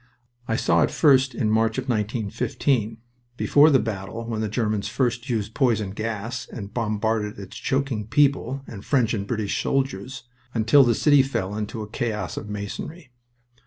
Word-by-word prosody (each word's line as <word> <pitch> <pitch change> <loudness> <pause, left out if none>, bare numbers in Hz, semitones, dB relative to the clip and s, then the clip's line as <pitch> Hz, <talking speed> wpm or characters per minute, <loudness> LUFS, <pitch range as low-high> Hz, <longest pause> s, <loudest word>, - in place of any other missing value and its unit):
I 115 - 0
saw - - +2
it - - +3
first 135 -4 +4
in 110 -4 0
March 110 0 +2
of 130 0 -3
1915, 110 +1 -1 0.4
before 145 +4 +5
the 140 - +5
battle 110 0 -4
when 110 -2 -2
the 110 - -1
Germans 105 -2 -1
first 120 +2 -1
used 110 -2 -2
poison 110 -7 +1
gas 115 +3 -4
and 105 -3 -7
bombarded 110 -2 -1
its 100 -2 -9
choking 135 -6 -1
people, 135 0 +2
and 100 -5 -9
French 125 -5 +2
and 100 -3 -3
British 110 -3 -1
soldiers, 130 -1 -2 0.3
until 115 +5 +6
the 120 -2 +3
city 145 +2 +5
fell 105 -7 -2
into 110 +1 -4
a - - -8
chaos 110 0 -3
of 105 - -6
masonry. 115 - -6
115 Hz, 160 wpm, -24 LUFS, 105-130 Hz, 0.4 s, until